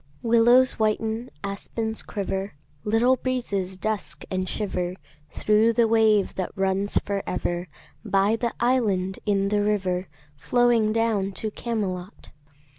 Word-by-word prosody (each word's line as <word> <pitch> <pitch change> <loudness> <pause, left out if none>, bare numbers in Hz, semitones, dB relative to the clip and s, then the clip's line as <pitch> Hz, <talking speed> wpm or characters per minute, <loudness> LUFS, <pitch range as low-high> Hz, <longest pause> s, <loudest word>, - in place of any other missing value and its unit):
Willows 235 +2 +4
whiten, 220 +2 0
aspens 220 +3 -4
quiver, 195 -2 -4 0.3
Little 235 +5 +3
breezes 200 -8 -2
dusk 215 +1 -3
and 185 0 -1
shiver 180 -4 -2 0.3
Thro' 215 +6 +3
the 230 0 +3
wave 220 -3 +3
that 185 -2 -3
runs 195 +1 0
for 200 -1 -1
ever 175 0 -2 0.4
By 200 0 +2
the 235 0 -2
island 205 -7 +1
in 200 -1 +2
the 205 0 +1
river 190 -3 0 0.3
Flowing 235 - +2
down 215 -3 0
to 215 +2 -4
Camelot. 205 -5 -4
210 Hz, 120 wpm, -25 LUFS, 190-230 Hz, 0.4 s, Willows